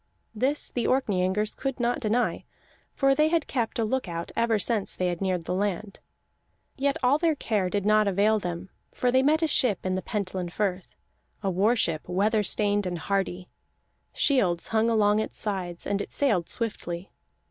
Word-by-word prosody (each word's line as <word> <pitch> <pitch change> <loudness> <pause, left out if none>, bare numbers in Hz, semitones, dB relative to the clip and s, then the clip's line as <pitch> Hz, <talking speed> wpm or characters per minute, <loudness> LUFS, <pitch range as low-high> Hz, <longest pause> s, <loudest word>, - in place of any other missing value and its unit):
This 265 +7 -1
the 240 -2 -1
Orkneyingers 210 -4 +1
could 270 -1 -3
not 240 0 +1
deny, 240 +1 0 0.5
for 275 -1 +3
they 305 +2 +3
had 325 -1 +1
kept 235 -4 -2
a 225 - +1
look 260 0 -1
out 170 0 -5
ever 230 -1 +2
since 210 -1 0
they 180 -1 0
had 175 0 -4
neared 185 -3 -1
the 180 - -2
land. 200 +1 -2 0.8
Yet 280 0 0
all 265 +4 +4
their 330 -2 +2
care 210 -8 -1
did 200 +1 -1
not 215 0 +4
avail 205 +3 +3
them, 175 0 -5 0.2
for 250 - 0
they 260 +1 +4
met 310 +4 +3
a - - +3
ship 250 - +1
in 185 - 0
the 185 - -1
Pentland 185 -5 -3
Firth, 190 -3 -2 0.5
a 195 - +1
war 205 +7 +3
ship, 165 -8 -1
weather 210 +4 +2
stained 205 -1 +2
and 175 -1 -3
hardy; 185 0 -2 0.6
shields 190 - +1
hung 225 +1 +2
along 210 -2 +3
its 220 - -4
sides, 185 -5 -3
and 200 0 -1
it - - -7
sailed 215 - +1
swiftly. 190 -6 -4
210 Hz, 180 wpm, -26 LUFS, 185-245 Hz, 0.8 s, all